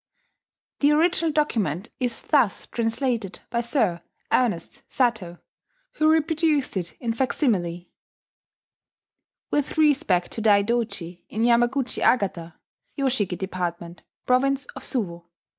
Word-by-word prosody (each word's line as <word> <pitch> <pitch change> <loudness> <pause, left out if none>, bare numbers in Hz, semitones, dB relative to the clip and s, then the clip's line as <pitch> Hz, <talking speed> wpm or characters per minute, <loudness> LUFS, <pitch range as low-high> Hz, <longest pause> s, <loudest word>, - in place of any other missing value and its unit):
The 290 +1 +4
original 330 +1 +2
document 220 - -1
is 245 -3 -2
thus 270 -10 +2
translated 230 -3 -2
by 235 - 0
Sir 225 - 0 0.3
Ernest 210 -10 0
Satow, 220 -9 0 0.6
who 310 0 +4
reproduced 315 -4 +1
it 175 -3 -3
in 235 -2 -2
facsimile: 195 - -1 1.6
"With 290 +1 -1
respect 275 - +2
to 225 - -4
Daidoji 205 -4 +1
in 220 - -2
Yamaguchi 240 +2 +2
Agata, 185 -8 +1 0.4
Yoshiki 245 -10 0
department, 175 -2 -5 0.2
province 275 +2 +2
of - - -8
Suwo. 175 -9 -1
235 Hz, 105 wpm, -24 LUFS, 185-275 Hz, 1.6 s, The